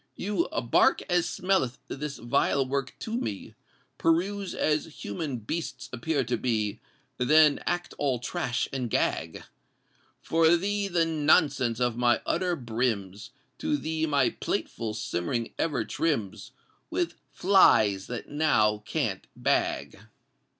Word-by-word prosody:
You 195 -3 -1 0.2
bark 115 - +3
as 175 -1 +2
smelleth 180 -10 0
this 145 0 -5
vile 135 +2 +1
work 135 0 -3
to 225 - -3
me, 105 - -4 0.5
Peruse 185 +4 +1
as 155 +1 -1
human 130 +5 -3
beasts 145 +4 -5
appear 135 +3 0
to 120 0 -1
be, 110 -3 -1 0.4
Then 150 +3 +5
act 175 0 -1
all 135 -3 +1
trash 120 -1 -2
and 125 -3 -2
gag! 80 -6 -1 0.8
For 165 +1 +3
thee 200 +3 -1
the 170 -3 +2
nonsense 150 -6 +2
of 120 -2 0
my 120 -1 +3
utter 180 +1 0
brims; 110 - -2 0.3
To 305 -1 0
thee 160 - -2
my 140 -4 +2
platefull 110 -2 -3
simmering 110 +3 -2
ever 140 -9 0
trims 110 - -2 0.4
With 350 -2 -1 0.2
flies 110 - +4
that 125 -2 -5
now 110 -9 +2
can't - - -2
bag! - - 0
140 Hz, 125 wpm, -27 LUFS, 115-165 Hz, 0.8 s, Then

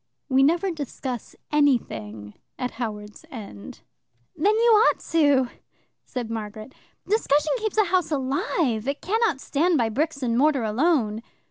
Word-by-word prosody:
We 265 0 +4
never 345 +7 +3
discuss 270 -6 -6 0.2
anything 110 - 0 0.2
at 250 -1 -3
Howards 210 -2 -6
End." 205 - -10 0.5
"Then 415 +7 +2
you 465 +1 +4 0.2
ought - - +3
to!" 285 -6 +3 0.6
said 240 -3 -5
Margaret. 215 +3 -6 0.3
"Discussion 310 -8 +2
keeps 435 -2 -3
a 430 - +6
house 365 -2 +1
alive. 265 -3 -1
It 280 +1 -3
cannot 430 - +1
stand 320 +5 +1
by 230 -3 +1
bricks 285 +3 -2
and 235 -2 0
mortar 285 -3 +3
alone." 225 -1 +1
275 Hz, 135 wpm, -24 LUFS, 225-325 Hz, 0.6 s, a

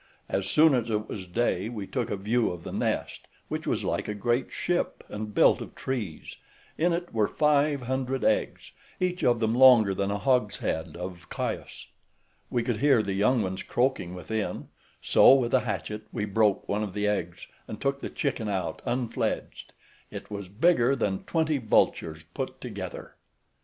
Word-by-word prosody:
As 95 0 -2
soon 155 -1 +5
as 120 -3 0
it 105 -1 -1
was 95 -3 -6
day 105 0 0
we 110 -4 -5
took 120 +1 -3
a - - -1
view 110 +4 +1
of 85 -2 -7
the - - -7
nest, - - -2 0.2
which - - -4
was - - 0
like - - -2
a 105 - -3
great 120 +4 0
ship, 175 0 -2
and 105 0 -5
built - - +4
of - - -9
trees; 115 -12 -5 0.4
in 175 +3 +2
it 175 +1 -3
were 110 -2 +2
five 150 -2 +2
hundred 130 +1 -2
eggs, 110 - 0 0.3
each 180 0 -1
of 120 -2 +3
them 110 -1 +1
longer 120 -5 +7
than 100 +1 -1
a 100 - -1
hogshead 105 -10 0
of 90 0 -7
Chios. - - -4 0.6
We 120 - 0
could 120 -3 -1
hear 130 -2 +4
the 100 -1 -2
young 105 +4 +2
ones 95 0 -3
croaking 120 -8 -1
within; 110 +4 -4 0.3
so, 135 - +7
with 125 -3 0
a 130 - +6
hatchet 110 -2 -4
we 105 -3 -2
broke 105 -1 +1
one 105 +1 -1
of 105 -3 -4
the 105 0 0
eggs, 90 -5 -2 0.2
and 110 - -7
took 140 0 -1
the - - -5
chicken 125 -7 -2
out 90 -5 -3
unfledged; 120 -2 -2 0.4
it - - -9
was 100 -2 -5
bigger 130 - +3
than 100 -6 -2
twenty 160 -3 +1
vultures 80 -8 +1
put - - -4
together. - - -7
110 Hz, 180 wpm, -27 LUFS, 100-130 Hz, 0.6 s, longer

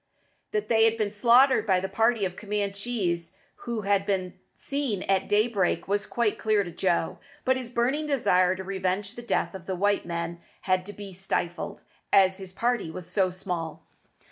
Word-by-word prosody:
That 425 -1 -1
they 225 -1 +5
had 225 0 +3
been 210 -2 0
slaughtered 240 +4 +5
by 190 -2 +4
the 190 - -3
party 220 +2 +2
of 185 -1 -4
Camanchees 200 -3 -2 0.3
who 235 -2 -1
had 200 -1 +2
been 190 -3 -1 0.2
seen 275 -9 -2
at 195 -1 +1
daybreak 205 -3 +2
was 205 +1 0
quite 235 -3 0
clear 215 -2 +2
to 175 - -7
Joe; 170 -1 0 0.3
but 260 - +4
his 255 -2 -5
burning 260 +6 0
desire 185 -10 +3
to 190 - -6
revenge 190 +1 -2
the 240 - -8
death 240 - -1
of 185 -3 -9
the 190 - -1
white 205 0 +1
men 170 0 -4 0.2
had 185 0 0
to 205 - -7
be 200 -2 -9
stifled, 175 -2 -3 0.3
as 190 0 +5
his 190 -1 -8
party 235 -2 0
was 170 +1 -7
so 185 +1 +2
small. 180 -3 -5
200 Hz, 180 wpm, -27 LUFS, 185-225 Hz, 0.3 s, they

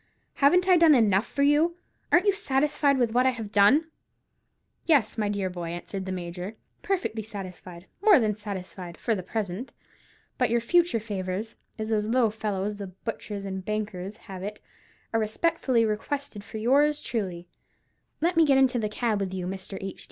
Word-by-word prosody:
Haven't 360 +7 +5
I 365 -2 +6
done 325 -3 +7
enough 215 -3 +3
for 280 - -1
you? 300 +4 +3 0.4
Ain't 350 +3 +5
you 405 - +4
satisfied 285 -5 +1
with 240 -3 +1
what 250 +3 +3
I - - +6
have 225 -5 -5
done?" 255 +11 +4 0.9
"Yes, 285 -10 +3
dear 205 -3 -1
boy," 175 -2 -5
answered 190 +3 -5
the - - -3
Major, 180 +3 -5 0.3
"perfectly 365 - -1
satisfied, 185 -4 -8 0.2
more 410 -3 +7
than 215 -3 +1
satisfied—for 195 0 -5
the 195 - -2
present. 205 +4 -4 0.7
But 250 - +3
your 235 +1 +2
future 335 +2 +2
favours—as 210 +1 -5
those 210 -1 +1
low 235 -1 +3
fellows, 210 -1 -3
the 200 - -5
butchers 200 +1 -6
and 190 -1 -4
bakers, 210 -1 -4
have 190 -3 -8
it—are 210 +2 -7
respectfully 240 +1 +1
requested 220 +1 -3
for 220 +1 -8
yours 285 +6 +3
truly. 180 -6 -4 0.7
Let 345 +2 +2
me 330 - +6
get 280 -3 +4
into 260 -2 +3
the 215 -2 -1
cab 215 -1 0
with 190 -1 -3
you, 180 -1 -3
Mr. 190 +1 -5
H. 195 -1 -6
215 Hz, 165 wpm, -27 LUFS, 195-270 Hz, 0.9 s, done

